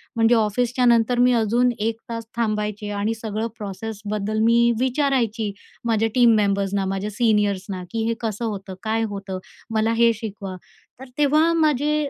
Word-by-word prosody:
म्हणजे 230 +1 +4
ऑफिसच्यानंतर 240 +2 +2
मी 250 0 +5
अजून 235 +2 +2
1 225 +1 -1
तास 230 -1 -5
थांबायचे 210 -2 -1
आणि 215 +2 0
सगळं 220 0 -3
प्रोसेसबद्दल 210 0 -4
मी 235 +1 +4
विचारायची 250 -5 0 0.3
माझ्या 225 -1 +1
टीम 240 -3 +6
मेंबर्सना, 200 -1 +1
माझ्या 195 +2 -2
सीनियर्सना, 205 -4 0
की 225 -1 -1
हे 230 - +1
कसं 225 0 -3
होतं? 195 -3 -5
काय 225 +1 0
होतं? 195 -2 -5 0.4
मला 220 +1 +2
हे 235 0 +4
शिकवा. 205 -3 -6 0.4
तर 265 -1 -11
तेव्हा 305 +3 +4
माझे 300 -2 +1
225 Hz, 145 wpm, -22 LUFS, 205-240 Hz, 0.4 s, टीम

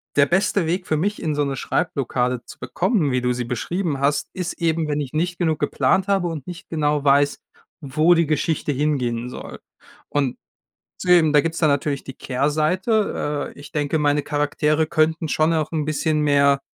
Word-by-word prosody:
der 140 - +5
beste 190 +1 +1
Weg 175 +3 -2
für 155 - +1
mich, 205 +7 -1
in 155 -2 -1
so 145 - +1
'ne 140 -1 -2
Schreibblockade 125 -4 -1
zu - - -13
bekommen, 185 - 0
wie 125 0 0
du 125 0 +1
sie 125 0 -2
beschrieben 145 - -2
hast, 140 +1 0
ist 180 -2 -3
eben, 165 -2 0
wenn 150 0 -1
ich 135 -1 -6
nicht 175 +3 -1
genug 160 -4 0
geplant 185 +8 +1
habe 195 -3 +1
und 160 -5 -6
nicht 175 -2 -8
genau 150 -2 0
weiß, 140 0 +3 0.4
wo 155 +5 +3
die 170 0 +3
Geschichte 155 0 0
hingehen 125 -4 -1
soll. - - -9 0.5
Und 140 -4 -1 0.7
deswegen 175 -4 +4
da 150 - +6
gibt 165 +2 -2
es - - -4
dann 155 - +4
natürlich 140 0 -1
die 135 - -8
Kehrseite. 150 - 0
Äh, - - -15
ich 145 - -12
denke, 150 +1 0
meine 145 0 +2
Charaktere 150 +1 0
könnten 160 +1 +1
schon 155 +2 +2
auch 155 -1 -1
'n 155 -2 -1
bisschen 155 0 0
mehr 140 -1 +3
150 Hz, 190 wpm, -22 LUFS, 140-165 Hz, 0.7 s, da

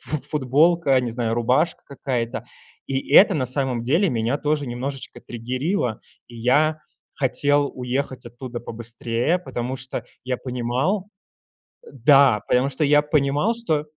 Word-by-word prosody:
фу 135 +5 -3
футболка, 150 +2 +3
а 130 - +5
не 120 -2 -3
знаю, 115 -1 -1
рубашка 125 +8 +1
какая-то. 125 -4 -3 0.4
И 135 0 -3
это 195 0 +8
на 140 -5 0
самом 130 -2 -2
деле 160 - +2
меня 120 +1 0
тоже 150 -1 -1
немножечко 130 +3 -6
триггерило, 125 - -2 0.3
и 120 - -13
я 150 +6 +2 0.3
хотел 145 +1 +1
уехать 130 +1 -3
оттуда 120 0 -7
побыстрее, 115 +6 -2
потому 130 -7 -4
что 130 +1 -6 0.2
я 125 -1 -2
понимал 130 - -1 0.8
э, - - -13
да, 135 -3 +5
потому 125 +2 +2
что 140 +3 -2
я 150 0 +5
понимал, 150 +7 +1
что 160 -11 -1
130 Hz, 140 wpm, -23 LUFS, 120-150 Hz, 0.8 s, это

